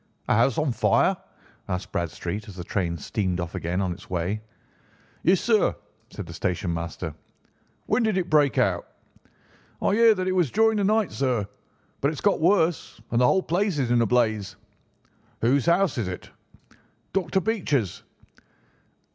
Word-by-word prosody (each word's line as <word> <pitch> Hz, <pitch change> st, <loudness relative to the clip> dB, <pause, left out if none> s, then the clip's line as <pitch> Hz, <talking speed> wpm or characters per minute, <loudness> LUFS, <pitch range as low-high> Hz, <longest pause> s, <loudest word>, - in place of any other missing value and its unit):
"A -, -, +3 dB
house 115 Hz, +3 st, +3 dB
on 150 Hz, -3 st, +1 dB
fire?" -, -, +3 dB, 0.5 s
asked 90 Hz, +1 st, -3 dB
Bradstreet 85 Hz, +4 st, -3 dB
as 95 Hz, -, -10 dB
the 90 Hz, -, -6 dB
train 85 Hz, -2 st, -2 dB
steamed 90 Hz, +3 st, -2 dB
off 85 Hz, -1 st, -4 dB
again 85 Hz, +3 st, -2 dB
on 95 Hz, -2 st, -1 dB
its 90 Hz, +2 st, -9 dB
way. 90 Hz, +4 st, -2 dB, 0.8 s
"Yes, 185 Hz, +1 st, +4 dB
sir!" 220 Hz, -3 st, +2 dB, 0.3 s
said -, -, -7 dB
the -, -, -9 dB
station 90 Hz, 0 st, -2 dB
master. 85 Hz, -1 st, -4 dB, 0.7 s
"When -, -, +1 dB
did 220 Hz, -4 st, +1 dB
it 180 Hz, -2 st, 0 dB
break 145 Hz, -3 st, +3 dB
out?" -, -, +1 dB, 0.9 s
"I -, -, +1 dB
hear 225 Hz, 0 st, +6 dB
that 185 Hz, -1 st, -2 dB
it -, -, +1 dB
was 180 Hz, -6 st, +2 dB
during 220 Hz, -, +3 dB
the 205 Hz, -, +1 dB
night, 215 Hz, -1 st, +2 dB
sir, 125 Hz, -7 st, 0 dB, 0.5 s
but 140 Hz, -, +1 dB
it 150 Hz, -, 0 dB
has -, -, -6 dB
got 205 Hz, -5 st, +2 dB
worse, 170 Hz, -, +2 dB
and 120 Hz, +1 st, +2 dB
the 125 Hz, -, +5 dB
whole 190 Hz, +8 st, +3 dB
place 185 Hz, 0 st, 0 dB
is 130 Hz, -4 st, 0 dB
in 120 Hz, -1 st, +4 dB
a 115 Hz, -, +2 dB
blaze." 110 Hz, -4 st, +1 dB, 0.9 s
"Whose 135 Hz, +6 st, +2 dB
house 170 Hz, -5 st, +3 dB
is 105 Hz, -, -1 dB
it?" 90 Hz, -1 st, -7 dB, 0.8 s
"Dr. 190 Hz, 0 st, +1 dB
Becher's." 170 Hz, -, -1 dB
125 Hz, 170 wpm, -25 LUFS, -, 0.9 s, hear